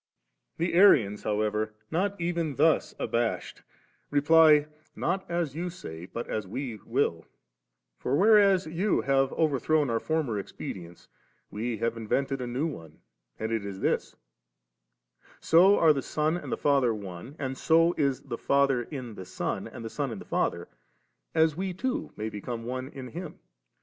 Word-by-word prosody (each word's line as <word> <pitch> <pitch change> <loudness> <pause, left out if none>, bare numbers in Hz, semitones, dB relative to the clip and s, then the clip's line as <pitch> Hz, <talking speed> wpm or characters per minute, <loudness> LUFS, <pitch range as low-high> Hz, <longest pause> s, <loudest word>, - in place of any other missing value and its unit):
17. 170 +2 -1
The 170 - +4
Arians, 110 - +5
however, 110 0 -1 0.2
not 195 +4 0
even 170 -4 -1
thus 155 +3 +2
abashed, 115 -1 -2 0.5
reply, 155 +2 +6
^ 150 0 +5 0.3
Not 185 +3 -2
as 170 -5 -1
you 175 +2 -3
say, 85 - -9
but 115 +5 -6
as 105 -3 -3
we 120 +2 -5
will 115 - -1 0.2
« - - -57
;* - - -56
for, 130 - 0
whereas 200 0 +5
you 175 +6 0
have 135 0 +2
overthrown 150 -2 +1
our 115 - +1
former 150 -9 -1
expedients, 90 -3 -8 0.4
we 115 +2 -3
have 115 +1 -1
invented 135 +4 -1
a 125 - -3
new 125 +6 -1
one, 80 - -7 0.4
and 110 +1 -3
it 110 -2 -1
is 100 -1 -6
this: - - 0 0.6
— - - -55 0.5
So 185 +5 +5
are 160 -2 +6
the 140 - -2
Son 155 +4 0
and 175 - -6
the - - -1
Father 135 -5 +2
One, 100 +6 -8
and 135 -2 -3
so 165 +4 +3
is 140 -5 0
the 115 - -6
Father 140 -2 +2
in 125 -2 -7
the 95 -3 -9
Son 90 - -3
and 115 - -9
the - - -4
Son 145 -2 -2
in 110 - -5
the - - -10
Father, - - -1 0.7
as 160 -1 +3
we 185 +1 -3
too 260 - -2
may 110 - -3
become 115 +2 -5
one 130 +1 -4
in 135 -3 -9
Him. 170 +1 -7
135 Hz, 175 wpm, -28 LUFS, 110-165 Hz, 0.7 s, reply